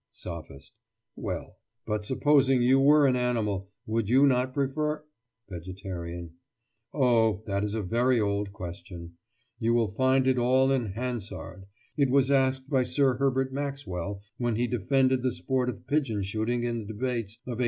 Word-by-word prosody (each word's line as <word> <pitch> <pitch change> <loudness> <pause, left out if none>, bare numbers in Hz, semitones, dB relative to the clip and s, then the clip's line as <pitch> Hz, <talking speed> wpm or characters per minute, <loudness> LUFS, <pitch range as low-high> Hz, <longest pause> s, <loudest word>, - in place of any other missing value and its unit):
SOPHIST: 80 -6 -9 0.4
Well, - - -5 0.3
but 105 -1 -2
supposing 135 0 +3
you 130 +2 +5
were 145 +2 +6
an 130 -2 +3
animal, 110 -6 -1 0.2
would 110 -1 -1
you 135 +4 +6
not 130 -1 +2
prefer—— 150 +3 -1 0.4
VEGETARIAN: 85 -2 -7 0.6
Oh, 115 -6 +2
that 100 -1 -1
is 105 +1 -2
a 110 - -2
very 120 +5 +2
old 100 -1 -1
question. 85 -3 -9 0.4
You 115 0 +2
will 115 -5 +1
find 130 +3 +3
it 130 -1 +3
all 130 +2 +3
in 120 -8 0
Hansard. 105 -5 -5 0.3
It 140 -3 +3
was 135 +1 +3
asked 130 -1 +2
by 135 -3 +2
Sir 130 -1 +2
Herbert 135 -1 0
Maxwell 100 -9 -4 0.2
when 120 -2 0
he 120 +2 +1
defended 130 +3 +1
the 130 0 +1
sport 125 +8 -1
of 100 -7 -7
pigeon 130 -9 0
shooting 110 +5 -1
in 120 -1 -1
the 110 - -7
Debates 115 -2 -3
of 125 - -4
1883. - - -6
120 Hz, 160 wpm, -28 LUFS, 100-130 Hz, 0.6 s, were